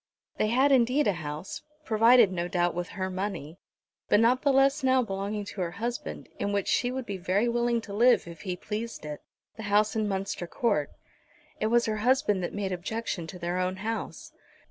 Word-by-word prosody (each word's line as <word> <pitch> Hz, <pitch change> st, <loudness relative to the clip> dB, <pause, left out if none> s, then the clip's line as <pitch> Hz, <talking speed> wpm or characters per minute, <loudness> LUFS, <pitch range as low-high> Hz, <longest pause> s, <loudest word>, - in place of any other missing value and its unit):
They 215 Hz, -, +2 dB
had 260 Hz, +6 st, +3 dB
indeed 260 Hz, +3 st, +4 dB
a 205 Hz, -, +3 dB
house, 150 Hz, +4 st, -6 dB, 0.2 s
provided 225 Hz, -1 st, +5 dB
no 175 Hz, -1 st, -2 dB
doubt 175 Hz, -1 st, +1 dB
with 175 Hz, +1 st, -4 dB
her 190 Hz, 0 st, -2 dB
money, 185 Hz, -4 st, -4 dB, 0.5 s
but 205 Hz, -, +5 dB
not 245 Hz, +3 st, +4 dB
the 285 Hz, -, +3 dB
less 275 Hz, +2 st, +3 dB
now 260 Hz, -1 st, +4 dB
belonging 200 Hz, 0 st, -3 dB
to 200 Hz, -1 st, -6 dB
her 175 Hz, -, -1 dB
husband, 235 Hz, +2 st, -4 dB
in 200 Hz, -, -1 dB
which 200 Hz, -1 st, -1 dB
she 245 Hz, -, +2 dB
would 260 Hz, -1 st, -4 dB
be 200 Hz, -3 st, -4 dB
very 190 Hz, +5 st, +1 dB
willing 235 Hz, 0 st, +1 dB
to 205 Hz, -3 st, -9 dB
live 240 Hz, -1 st, +4 dB
if 170 Hz, -1 st, -10 dB
he 185 Hz, -3 st, -3 dB
pleased 215 Hz, 0 st, -5 dB
it, 150 Hz, -1 st, -6 dB, 0.4 s
the -, -, -6 dB
house 210 Hz, +2 st, +3 dB
in 215 Hz, -1 st, 0 dB
Munster 195 Hz, -3 st, -3 dB
Court. 185 Hz, -9 st, 0 dB, 0.7 s
It 215 Hz, -, +1 dB
was 235 Hz, +1 st, +3 dB
her 215 Hz, -1 st, -1 dB
husband 245 Hz, -3 st, +2 dB
that 175 Hz, -, -3 dB
made 200 Hz, -2 st, -3 dB
objection 185 Hz, -1 st, -3 dB
to 180 Hz, -, -8 dB
their 175 Hz, +1 st, -2 dB
own 185 Hz, 0 st, 0 dB
house. 220 Hz, +4 st, -5 dB
210 Hz, 200 wpm, -28 LUFS, 185-235 Hz, 0.7 s, provided